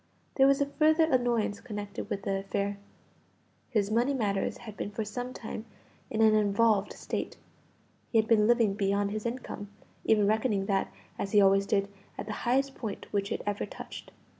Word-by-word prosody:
There 270 0 +5
was 275 +1 +4
a 280 - +3
further 310 +3 +3
annoyance 245 -8 +1
connected 205 -3 -6
with 200 -3 -3
the 195 0 0
affair. 200 +1 -2 0.9
His 210 -4 0
money 245 +5 +2
matters 200 -5 -1
had 220 -4 -10
been - - -4
for 215 +1 -4
some 245 +4 -4
time 220 -2 -7 0.4
in 225 0 +1
an 220 -1 +6
involved 210 0 +3
state; - - -4 0.7
he 230 - +3
had 220 0 +3
been 215 -2 +4
living 230 -4 +4
beyond 200 0 0
his 215 +2 -2
income, 235 -4 -6 0.3
even 215 -2 +4
reckoning 215 -1 +1
that, 195 -1 0 0.3
as 195 - -3
he 210 - +7
always 195 0 +4
did, 200 -2 +1 0.3
at - - -4
the 210 - -4 0.2
highest 270 +2 +2
point 220 -6 -6
which 200 -1 0
it - - -2
ever 205 -1 -2
touched. - - -9
215 Hz, 180 wpm, -29 LUFS, 200-240 Hz, 0.9 s, he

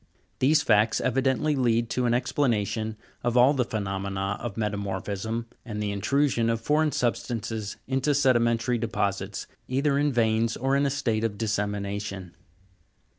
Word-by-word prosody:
These 145 +3 +4
facts 110 0 +3
evidently 135 +4 +1
lead 120 -3 +1
to 125 -1 +1
an 120 - +2
ex 125 0 -1
planation 110 -4 0 0.3
of 120 0 +1
all 125 +4 +6
the 130 -3 +1
phenomena 100 -2 -3
of 115 -4 -5
metamorphism, 100 +1 -3 0.2
arid 105 -3 -5
the 105 -1 -1
intrusion 115 +3 +1
of 115 -1 0
foreign 150 +5 +2
substances 115 -4 -2
into 135 +2 +1
sedimentary 120 -3 +2
deposits, 100 -3 -2 0.2
either 140 +2 +1
in 145 0 +2
veins 115 -1 +1
or 135 +2 +1
in 140 0 +2
a - - +1
state 120 -6 -1
of 110 -3 -1
dissemination. 100 -3 -3
115 Hz, 145 wpm, -26 LUFS, 105-130 Hz, 0.3 s, all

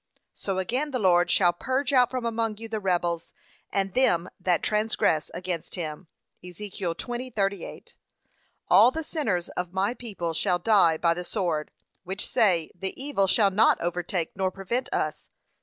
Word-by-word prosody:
So 195 -2 -4
again 250 +10 -1
the 265 - -2
Lord 175 -5 +3
shall 175 -2 +4
'purge 260 +8 -1
out 250 -2 +5
from 255 -2 -3
among 225 -2 -1
you 225 +1 -7
the 220 -1 -3
rebels, 175 -3 -1 0.4
and 195 -1 -1
them 180 -9 +2
that 180 -1 +1
transgress 210 -7 +1
against 175 -2 -4
him.' 160 0 -5 0.4
(Ezek. 180 +3 -8
20:38) 200 +1 -3 0.7
'All - - +7
the 320 +5 -4
sinners 225 - -2
of 180 0 -4
my 195 +4 +1
people 205 -9 -4
shall 175 +2 +1
die 175 -4 +4
by 170 +1 +2
the 180 +1 -4
sword, 175 -6 -2 0.3
which 190 +3 -4
say, 185 -9 +2
The 190 +5 -6
evil 270 -8 +1
shall 200 +1 +4
not 215 +4 +4
overtake 175 0 -2
nor 190 -1 0
prevent 195 +7 -3
us.' - - -2
195 Hz, 155 wpm, -26 LUFS, 175-225 Hz, 0.7 s, All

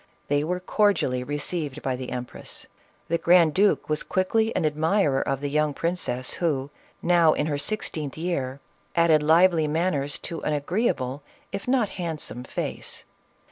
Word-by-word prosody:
They 145 0 +2
were 180 +3 -1
cordially 185 - +1
received 145 +1 -3
by 130 -1 0
the 125 0 -6
empress; 125 -1 -6 0.4
the 170 0 0
grand 170 -3 +5
duke 200 +4 +3
was 155 0 0
quickly 220 +4 +1
an - - +1
admirer 155 -1 +2
of 135 0 -2
the 145 - -1
young 150 -1 +1
princess, 145 -8 -1
who, 145 -5 0 0.3
now 170 -3 +5
in 150 - 0
her 145 -2 -1
sixteenth 155 -7 -3
year, 140 -6 -2 0.4
added 165 -3 +5
lively 165 +1 +4
manners 150 -3 0
to 165 - -5
an 150 - 0
agreeable, 145 - -1 0.3
if 200 +2 -5
not 250 -5 +2
handsome 160 -8 -4
face. - - -5
155 Hz, 150 wpm, -25 LUFS, 145-180 Hz, 0.4 s, grand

